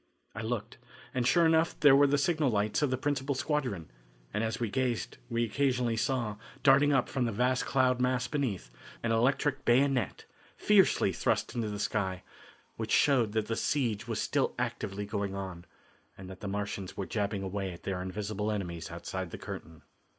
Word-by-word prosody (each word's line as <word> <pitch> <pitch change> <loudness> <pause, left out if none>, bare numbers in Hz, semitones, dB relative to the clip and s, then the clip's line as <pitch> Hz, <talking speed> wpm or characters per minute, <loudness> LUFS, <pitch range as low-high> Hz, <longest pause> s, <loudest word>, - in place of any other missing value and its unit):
I - - -5
looked, 115 0 -4 0.3
and 125 -1 +1
sure 170 +4 +5
enough 160 0 +3
there 145 -2 +7
were 145 +1 +6
the 145 +1 +2
signal 155 0 +2
lights 105 +1 +1
of 145 - +2
the 130 - 0
principal 140 0 -1
squadron, 125 - -2 0.4
and 105 - 0
as 115 +1 -2
we 120 - 0
gazed 125 -2 -1
we 115 0 0
occasionally 125 -1 +1
saw, 115 -2 -1 0.3
darting 140 +1 +6
up 135 -3 +3
from 130 -2 -1
the 115 - 0
vast 125 +4 +1
cloud 130 -2 +2
mass 125 -1 +1
beneath, 110 - -2 0.3
an 115 - +1
electric 135 +4 +1
bayonet, 130 -3 +2 0.3
fiercely 195 - +4
thrust - - 0
into 115 -3 -2
the 105 - -4
sky, 95 -3 -1 0.5
which - - -4
showed 120 -7 +3
that 110 -1 +1
the 115 - -2
siege 115 -7 0
was 115 -4 -2
still - - 0
actively 100 +1 -3
going 100 -1 -3
on, 95 -3 -6 0.5
and 95 0 -9
that 95 - -10
the 100 - -6
Martians 100 -1 -4
were 95 - -2
jabbing 100 -1 -2
away 95 0 -3
at 85 - -11
their 95 -2 -2
invisible 105 +3 -3
enemies 90 -6 -4
outside - - -5
the - - -7
curtain. 80 -2 -8
115 Hz, 180 wpm, -30 LUFS, 100-135 Hz, 0.5 s, there